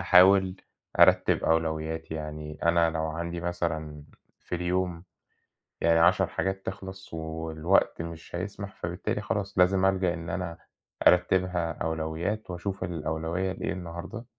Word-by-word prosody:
أحاول 95 0 +6 0.4
أرتّب - - +5
أولويّاتي، 80 0 0
يعني 75 -1 -6
أنا 85 -1 +4
لو 80 -1 -2
عندي 85 +2 -4
مثلًا 80 -4 -3 0.4
في - - -6
اليوم 90 0 -1 0.8
يعني 85 0 +4
10 90 +2 +5
حاجات 95 0 -2
تخلص 95 -2 -7
والوقت 80 +2 0
مش 85 +1 -7
هيسمح، 100 +2 -5
فبالتالي 85 +1 -3
خلاص - - -3
لازم 95 +1 +4
ألجأ 95 -2 +2
إن 85 -1 -6
أنا 85 -3 -3 0.5
أرتّبها 90 -1 +3
أولويّات 80 +6 -3
وأشوف 95 +2 -4
الأولويّة 85 +2 -2
إيه - - -3
النهارده 90 +6 -7
85 Hz, 120 wpm, -28 LUFS, 80-95 Hz, 0.8 s, أحاول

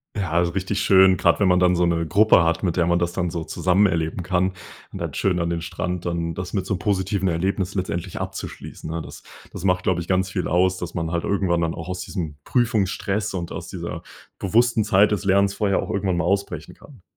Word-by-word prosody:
Ja, 85 -4 +1
so 85 - -1
richtig 95 +2 -2
schön. 95 -2 +6
Grad 85 -2 +2
wenn 100 - +3
man 90 0 +4
dann 90 0 +4
so 90 - +3
'ne 85 -1 +1
Gruppe 105 +1 +5
hat, 85 +2 0
mit 90 -3 0
der 85 - +2
man 85 0 +2
das 85 0 -1
dann 90 -1 -1
so 80 -1 -4
zusammen 95 +3 +2
erleben 85 -1 -1
kann 90 +1 +1 0.4
und - - -7
dann - - -4
schön 90 -2 0
an 85 0 -1
den 85 -1 -2
Strand, 90 0 -4
dann 85 -1 -2
das 90 +1 -5
mit 95 -2 -2
so 100 - -1
positiven 95 0 0
Erlebnissen 95 +3 -1
letztendlich 90 0 -4
abzuschließen, - - -7
ne? 85 0 -3
Das - - -11 0.3
das - - -7
macht, 90 -1 +1
glaube 90 -1 +1
ich, 85 - -9
ganz 95 0 +1
viel 95 -1 -2
aus, 90 +2 +3
dass 90 -2 -6
man 80 -1 -2
halt 85 0 -1
irgendwann 95 -4 +1
dann 80 -1 0
auch 80 +1 -7
aus 90 0 -4
diesem 85 -5 -5
Prüfungsstress 105 -3 0
und 85 -2 -4
aus - - -7
dieser - - -6 0.4
bewussten 115 +3 +2
Zeit 105 0 +4
des 105 - -2
Lernens 100 0 +3
vorher 100 -2 +1
auch - - -6
irgendwann 95 -3 0
mal 85 - 0
ausbrechen 100 +2 -2
kann. 130 -9 -17
90 Hz, 230 wpm, -23 LUFS, 85-100 Hz, 0.4 s, schön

